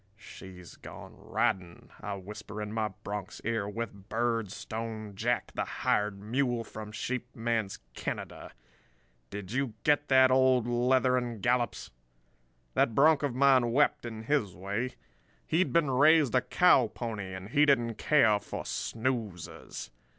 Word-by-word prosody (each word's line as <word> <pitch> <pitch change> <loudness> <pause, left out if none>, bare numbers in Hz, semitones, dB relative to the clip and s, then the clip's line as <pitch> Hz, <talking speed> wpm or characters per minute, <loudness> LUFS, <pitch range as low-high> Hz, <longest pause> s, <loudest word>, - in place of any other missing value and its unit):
"'She's 95 -4 -12
gone - - -11
riding,' 90 -2 -2
I 100 -1 -4
whisper 105 +2 -8
in 105 0 -5
my 110 -1 0 0.2
bronc's 100 -1 -5
ear, 110 -3 -1
'with 105 -2 -6
Birdstone 110 -1 -3
Jack, 120 +5 -1
the - - -1
hired 105 -1 -1
mule 120 +3 -1
from 110 -1 -9
Sheep 120 +3 -4
Man's 115 -4 -1 0.2
Canada. - - -5 0.8
Did 100 -1 -7
you 130 -3 -1
get 145 0 +2
that, 130 -1 +6
old 130 -2 +4
Leather 125 +1 +2
and 120 -3 -3
Gallops?' 120 +3 0 0.8
"That 115 - +2
bronc 150 +2 +5
of 140 -5 -1
mine 130 -3 +4
wept, 145 +3 +3
in 110 -1 -7
his 110 - 0
way. 100 +8 -3 0.5
He'd 175 +3 +1
been 165 -5 +2
raised 150 +1 +5
a 125 - +4
cow 175 -9 +4
pony 105 -5 -5
and 95 +2 -8
he 145 +5 +4
didn't 120 -5 +2
care 115 -9 +4
for 100 - -6
snoozers. 110 - -4
115 Hz, 140 wpm, -30 LUFS, 105-130 Hz, 0.8 s, that